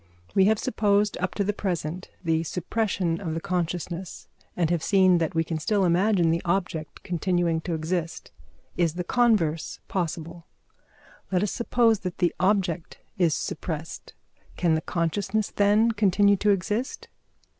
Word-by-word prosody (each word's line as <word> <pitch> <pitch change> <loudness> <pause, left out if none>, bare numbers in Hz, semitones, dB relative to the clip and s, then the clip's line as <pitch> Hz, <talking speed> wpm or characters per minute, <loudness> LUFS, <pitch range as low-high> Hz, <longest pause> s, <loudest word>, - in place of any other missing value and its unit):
We 190 - +5
have 220 +2 +4
supposed 205 -1 +1
up 185 +1 -2
to 200 - +1
the 210 +2 0
present 180 -3 -3
the 160 -1 +1
suppression 180 0 -1
of 160 -4 -3
the - - -1
consciousness, 175 0 -4 0.3
and 170 -2 +1
have 170 -2 +1
seen 185 -1 +4
that 165 0 -1
we 165 - +2
can 160 0 -3
still 200 +4 +1
imagine 180 -1 +3
the 165 +1 0
object 175 -4 -2
continuing 175 -1 0
to 170 0 -3
exist. 165 +1 -3 0.4
Is 170 -2 +1
the 180 - -2
converse 180 -8 +1
possible? 170 -2 -4 0.8
Let 185 0 +2
us 210 - -1
suppose 235 -2 +2
that 180 -3 -5
the 175 -2 +1
object 185 -3 0 0.2
is 170 -4 +3
suppressed. 160 -1 -5 0.4
Can 170 -2 +2
the 160 - +1
consciousness 200 +6 -1
then 210 +3 +3
continue 205 -1 +3
to 210 - +1
exist? 210 +6 -1
180 Hz, 150 wpm, -26 LUFS, 165-200 Hz, 0.8 s, We